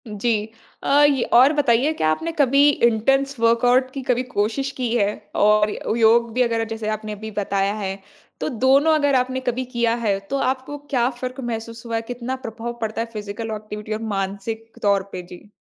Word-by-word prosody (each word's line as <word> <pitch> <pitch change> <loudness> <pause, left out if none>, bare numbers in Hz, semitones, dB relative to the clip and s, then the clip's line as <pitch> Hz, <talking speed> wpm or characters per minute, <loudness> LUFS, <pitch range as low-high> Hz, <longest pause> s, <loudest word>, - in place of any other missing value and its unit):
जी 220 +2 0 0.5
अ, 285 +1 +4
ये 280 -4 +4
और 260 +5 +7
बताइए 275 -1 +2
क्या 155 - 0
आपने 325 - -2
कभी 280 +1 +5 0.2
इंटेंस 270 +5 +1
वर्कआउट 245 +3 +3
की 275 - -4
कभी 250 -1 +1
कोशिश 225 +7 -1
की 250 -2 -1
है 205 -3 +2 0.2
और 210 0 +4 0.3
योग 230 +1 +4
भी 250 - +1
अगर 230 -2 +1
जैसे 220 -1 -4
आपने 215 0 -4
अभी 215 +1 -7
बताया 200 -1 0
है, 195 -1 -3 0.4
तो - - -2
दोनों 270 +5 +3
अगर 285 -2 +2
आपने 255 0 +1
कभी 255 +2 -2
किया 235 -1 +2
है, 210 -5 0
तो 195 +8 -4
आपको 265 +2 -2
क्या 245 -3 +2
फ़र्क 255 +1 -5
महसूस 230 -1 -5
हुआ 230 -1 -3
है? 225 - 0
कितना 245 +2 -5
प्रभाव 235 -2 -6
पड़ता 220 0 -2
है 230 - -3
फिजिकल 210 +1 -5
एक्टिविटी 210 0 -6
और 215 - -4 0.2
मानसिक 205 +4 -4
तौर 200 -1 +3
पे? 180 - -5
जी। 180 +3 -14
230 Hz, 190 wpm, -22 LUFS, 215-260 Hz, 0.5 s, और